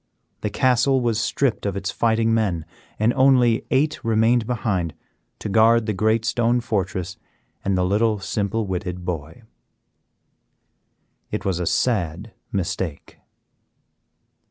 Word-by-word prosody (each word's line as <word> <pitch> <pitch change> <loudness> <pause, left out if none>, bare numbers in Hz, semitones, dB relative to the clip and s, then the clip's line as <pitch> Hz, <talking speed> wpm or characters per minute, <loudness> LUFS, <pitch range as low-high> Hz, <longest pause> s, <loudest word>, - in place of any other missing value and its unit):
The 105 - -2
castle 130 +3 +2
was 115 -3 0
stripped 135 -1 0
of 100 -1 -2
its 95 -1 -3
fighting 115 0 +1
men, 95 -8 0 0.3
and 110 +3 +2
only 130 -4 +3
eight 150 +3 +1
remained 115 0 +2
behind 95 - -1 0.4
to - - -6
guard 110 +3 +4
the 105 - -1
great 110 +3 +1
stone 120 +1 +2
fortress 95 -5 -3 0.5
and 100 -1 0
the 90 - +2
little 105 +3 +2
simple 105 +2 -2
witted 90 -1 -4
boy. 85 +6 -5 1.9
It - - -4
was 95 -3 0
a 90 - -2
sad 100 -3 0 0.2
mistake. 90 -5 -4
110 Hz, 125 wpm, -22 LUFS, 95-115 Hz, 1.9 s, guard